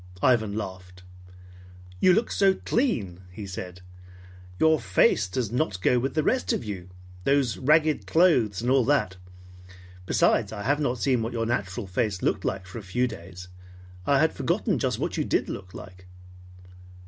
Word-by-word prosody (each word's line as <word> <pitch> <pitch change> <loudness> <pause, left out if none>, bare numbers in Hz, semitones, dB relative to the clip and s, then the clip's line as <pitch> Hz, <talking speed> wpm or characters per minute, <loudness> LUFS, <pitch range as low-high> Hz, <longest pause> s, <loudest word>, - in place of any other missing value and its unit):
Ivan 110 -5 +3
laughed. 90 -3 -7 1.0
"You 185 - +5
look 220 +4 +1
so 195 -1 +3
clean," 115 - -1
he 100 +3 -8
said. 90 -2 -7 0.8
"Your 160 +4 +4
face 100 -2 +2
does 110 +3 -3
not 120 -7 -1
go 125 +6 +2
with 135 +5 -3
the 155 - +2
rest 255 - +1
of - - -1
you, 95 -4 -7 0.3
those 135 0 +1
ragged 155 +2 +2
clothes 125 - +3
and 125 - +1
all 135 -1 +4
that. 130 -10 +1 0.9
Besides, - - +2
I 105 -2 -6
have 145 +5 +1
not 130 -4 0
seen 125 -1 +1
what 115 +2 -3
your 115 -1 -1
natural 100 -2 -2
face 100 0 -2
looked - - 0
like 95 0 -3
for 90 +5 -8
a - - -8
few 120 +6 -1
days. 90 -4 -10 0.6
I - - +4
had - - +2
forgotten - - 0
just - - -1
what - - -3
you - - +1
did - - 0
look 90 0 -8
like." 90 -1 -11
115 Hz, 170 wpm, -26 LUFS, 95-135 Hz, 1.0 s, You